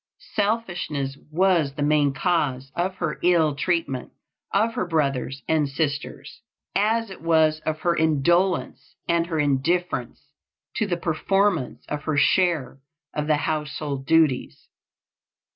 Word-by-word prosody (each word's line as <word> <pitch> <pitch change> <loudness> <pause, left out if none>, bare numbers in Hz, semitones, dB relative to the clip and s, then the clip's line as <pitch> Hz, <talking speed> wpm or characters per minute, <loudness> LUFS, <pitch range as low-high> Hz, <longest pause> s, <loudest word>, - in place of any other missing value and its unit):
Selfishness 180 -10 -1
was 165 -4 +2
the 145 - -2
main 145 -1 +3
cause 135 -4 -1
of 185 +2 -1
her 150 - -3
ill 170 -4 +3
treatment 145 -4 -2 0.4
of 220 +3 +2
her 185 - -2
brothers 140 -5 -1
and 155 -3 +2
sisters, 145 0 -4 0.3
as 220 +1 +1
it 190 - -10
was 160 -2 +3
of 155 0 -2
her 170 -1 +2
indolence, 170 +4 +1
and 170 0 +1
her 165 -2 -2
indifference 145 -1 -1 0.4
to 215 - 0
the 175 -3 -1
performance 175 -1 0
of 150 0 -5
her 155 -2 0
share 165 -4 +2 0.3
of 150 0 -2
the 155 -1 +3
household 150 -3 -3
duties. 155 - +1
155 Hz, 125 wpm, -24 LUFS, 145-175 Hz, 0.4 s, main